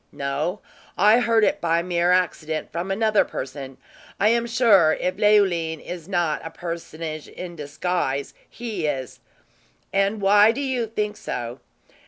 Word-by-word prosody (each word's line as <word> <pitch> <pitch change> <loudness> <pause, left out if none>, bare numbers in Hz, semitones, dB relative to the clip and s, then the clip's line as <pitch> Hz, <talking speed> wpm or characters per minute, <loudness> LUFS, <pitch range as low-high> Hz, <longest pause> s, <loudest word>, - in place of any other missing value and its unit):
"No; 145 +8 -3 0.4
I 210 +5 +6
heard 230 -2 +3
it - - +1
by 170 0 +1
mere 175 0 +1
accident 160 -4 0
from 170 +3 -4
another 215 +2 +3
person. 135 0 -7 0.4
I 210 - +4
am 235 +1 +1
sure, 205 -9 +4
if 185 - -2
Leoline 190 -7 +3
is 175 0 -8
not 175 -5 0
a 165 - -5
personage 165 -2 -6
in 175 -1 -8
disguise, 145 -2 -2 0.2
he 215 -9 -4
is." 135 -3 -4 0.7
"And 195 +2 +1
why 205 +2 +5
do 275 - -4
you 255 -4 -1
think 210 -1 -3
so?" 120 +1 -5
180 Hz, 145 wpm, -23 LUFS, 155-210 Hz, 0.7 s, I